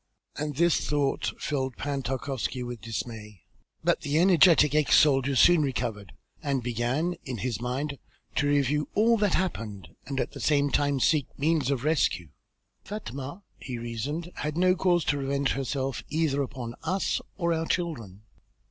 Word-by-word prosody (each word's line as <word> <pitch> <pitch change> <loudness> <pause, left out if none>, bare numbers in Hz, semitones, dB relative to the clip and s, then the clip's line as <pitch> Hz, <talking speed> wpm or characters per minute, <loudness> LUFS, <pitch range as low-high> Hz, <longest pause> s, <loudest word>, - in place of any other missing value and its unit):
And 150 -1 -3
this 170 +2 +2
thought 145 -2 0
filled 130 -4 -2
Pan 140 -1 -2
Tarkowski 130 0 -3
with 120 -2 -6
dismay, 110 -4 -6 0.4
but - - +2
the 145 +2 0
energetic 170 -4 +6
ex 150 -1 +4
soldier 140 -2 +4
soon 175 +5 +6
recovered 110 -8 -2 0.3
and 140 -5 -1
began 125 +9 -1
in 130 -3 -5
his 120 -1 -3
mind 135 +4 -3 0.4
to 145 - +2
review 145 +1 +1
all 230 +3 +4
that 205 -3 +2
happened 110 - -3 0.2
and 135 -1 -2
at - - -1
the - - -9
same 145 -2 +2
time 145 -1 +1
seek 145 +1 +2
means 150 -2 +1
of 135 -3 -1
rescue. 90 - +1 0.5
"Fatma," 170 - -6 0.2
he 125 -2 -5
reasoned, 135 +9 -4
"had 150 +1 -3
no 185 +1 +4
cause 175 -3 +2
to 145 - +1
revenge 140 0 0
herself 135 0 -2
either 150 -2 +1
upon 125 -3 -5
us 185 +4 0 0.2
or 170 -3 +1
our 165 0 -1
children. 115 - -3
140 Hz, 155 wpm, -27 LUFS, 125-160 Hz, 0.5 s, energetic